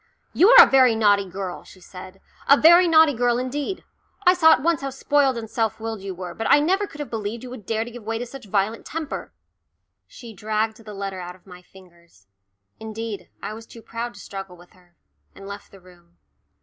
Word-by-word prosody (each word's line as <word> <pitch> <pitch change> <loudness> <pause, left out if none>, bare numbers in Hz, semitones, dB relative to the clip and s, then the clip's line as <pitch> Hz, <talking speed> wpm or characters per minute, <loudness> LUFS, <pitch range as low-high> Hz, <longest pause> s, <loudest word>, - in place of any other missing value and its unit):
"You 380 - +5
are - - +10
a - - -4
very 260 -3 +4
naughty 205 -3 +2
girl," 185 0 -6
she 185 - -17
said, 185 +1 -12 0.3
"a 280 - +8
very 345 +3 +7
naughty 320 -2 +5
girl 240 0 +1
indeed. 280 +8 -4 0.4
I 360 - +7
saw 320 -3 +5
at 255 - -1
once 335 -3 +1
how 275 - -3
spoilt 270 -1 +1
and 225 -1 -6
self 225 -1 -2
willed 225 -2 -5
you 195 -1 -6
were, 180 -1 -7
but 225 - -4
I - - +6
never 380 +7 0
could 290 - -14
have 295 - -6
believed 220 +1 -5
you 250 - -9
would 225 -6 -11
dare 225 0 -1
to 240 - -10
give 240 0 -10
way 225 +1 -4
to 245 - -5
such 265 0 -11
violent 205 +3 -1
temper." 320 -2 -6 0.8
She 235 -2 -12
dragged 215 +2 -2
the 215 -2 -11
letter 195 -1 -5
out 180 0 -8
of 185 - -25
my 180 -2 -13
fingers 170 - -21 0.5
indeed, 220 -1 -7
I - - -5
was 225 +1 -11
too 230 - -14
proud 230 +1 -6
to - - -13
struggle 195 -2 -9
with 175 +1 -19
her 180 -2 -26 0.4
and 195 - -12
left 200 0 -9
the 195 - -16
room. 175 - -22
220 Hz, 220 wpm, -22 LUFS, 195-260 Hz, 0.8 s, are